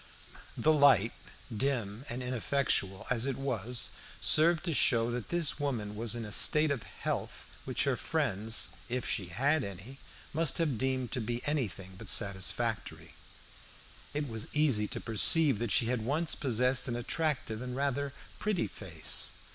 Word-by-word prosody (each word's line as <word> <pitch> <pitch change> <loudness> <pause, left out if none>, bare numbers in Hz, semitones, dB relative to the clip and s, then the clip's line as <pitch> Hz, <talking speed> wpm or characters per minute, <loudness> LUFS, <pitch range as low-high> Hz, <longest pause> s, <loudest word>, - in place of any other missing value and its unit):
The 155 - +3
light, 135 - +5 0.4
dim 120 -2 -2
and 125 +1 -4
ineffectual 125 -6 -1
as 125 +1 +1
it 135 - -2
was, 125 -3 -1 0.3
served 160 +1 +4
to 170 - 0
show 120 -4 +3
that 120 -2 -5
this 170 -4 0
woman 115 -8 -3
was 115 +1 0
in 115 -1 -4
a 105 - -8
state 150 +7 +5
of 135 -5 -2
health - - -5 0.2
which - - 0
her - - +1
friends, 110 +4 0 0.2
if 125 +1 -2
she 95 -6 -1
had 140 - +1
any, 100 +7 -9 0.3
must 160 -1 +2
have 150 -9 0
deemed 130 -2 -1
to 125 - -2
be 120 +2 -4
anything 105 - -3
but 110 - -6
satisfactory. 100 +3 0 1.0
It 145 0 -3
was 110 -3 -4
easy 135 -9 +2
to - - -5
perceive 125 - +5
that 120 -2 -2
she 115 - +4
had 120 0 -1
once 150 +7 0
possessed 125 0 +2
an 120 - -2
attractive 120 -3 -2
and 125 0 -5
rather 140 +1 -1 0.3
pretty 210 -5 0
face. 85 -6 -3
125 Hz, 155 wpm, -31 LUFS, 110-140 Hz, 1.0 s, light